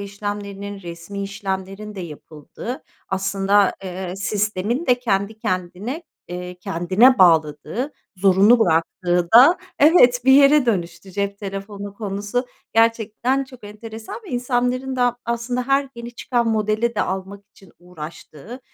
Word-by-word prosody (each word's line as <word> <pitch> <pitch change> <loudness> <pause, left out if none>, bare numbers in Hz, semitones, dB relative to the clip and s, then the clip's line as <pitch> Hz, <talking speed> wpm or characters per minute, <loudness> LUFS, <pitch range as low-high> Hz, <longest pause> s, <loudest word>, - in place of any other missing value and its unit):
işlemlerinin, 200 0 -6
resmî 170 +4 -7
işlemlerin 195 +1 -5
de 190 - -6
yapıldığı, 160 - -8 0.3
aslında, 195 +1 +2
eee, 185 0 -5
sistemin 210 - -1
de 250 -1 +3
kendi 210 -2 -1
kendine, 185 - -3 0.3
eee, 180 0 -6
kendine 190 +10 +3
bağladığı, 165 - +2 0.2
zorunlu 195 +5 +5
bıraktığı 175 -1 +1
da, 285 +10 +8 0.2
evet, 270 -6 +6
bir 265 - +6
yere 280 -1 +6
dönüştü. 175 -3 -2
Cep 200 0 -2
telefonu 200 0 -7
konusu, 205 +4 -3 0.3
gerçekten 230 +4 +2
çok 255 -4 -15
enteresan 220 +1 -9
ve - - -9
insanların 250 +1 -1
da, 245 -1 +2
aslında, 235 +2 -2
her 275 0 +2
yeni 235 0 -9
çıkan 240 -1 0
modeli 215 +2 0
de - - +1
almak 195 +2 -5
için 190 -4 -20
uğraştığı, 175 - -10
205 Hz, 125 wpm, -21 LUFS, 190-245 Hz, 0.3 s, da